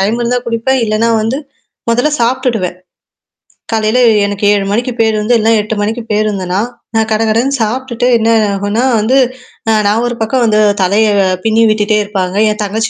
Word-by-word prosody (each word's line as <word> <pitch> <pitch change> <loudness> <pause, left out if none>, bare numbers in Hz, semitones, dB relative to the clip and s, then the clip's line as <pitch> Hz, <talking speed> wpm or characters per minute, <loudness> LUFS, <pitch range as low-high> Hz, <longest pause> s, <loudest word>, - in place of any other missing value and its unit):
Time 215 +5 0
இருந்தா 245 +1 0
குடிப்பேன். 235 +3 0
இல்லனா 215 +2 0
வந்து, 230 +5 -1 0.5
முதல்ல 245 +6 +1
சாப்டுடுவேன். 235 -7 -1 1.0
காலையில 220 +2 +1 0.3
எனக்கு 205 0 -3
7 200 -1 0
மணிக்கு 240 +4 -1
பேர் 220 -1 +2
வந்து 230 +3 +1
இல்ல 220 +1 +1
8 215 +1 -3
மணிக்கு 225 +3 -2
பேருந்தனா, 200 -3 -1 0.4
நான் 220 0 +1
கட, 215 - +1
கடன்னு 250 +5 +1
சாப்ட்டுட்டு 245 +2 -2
என்ன 225 0 0 0.2
ஆகும்ன்னா 205 +5 -1 0.2
வந்து, 245 +6 +2 0.5
அ - - +4 0.2
நான் 220 +3 +1
ஒரு 240 - -3
பக்கம் 240 +3 0
வந்து 215 -1 +2 0.2
தலைய 210 +4 +2 0.3
பின்னி 225 0 +2
விட்டுட்டே 215 0 +1
இருப்பாங்க. 190 -2 -3 0.2
என் 210 - -4
தங்கச்சி 220 +2 -2
220 Hz, 165 wpm, -13 LUFS, 210-235 Hz, 1.0 s, அ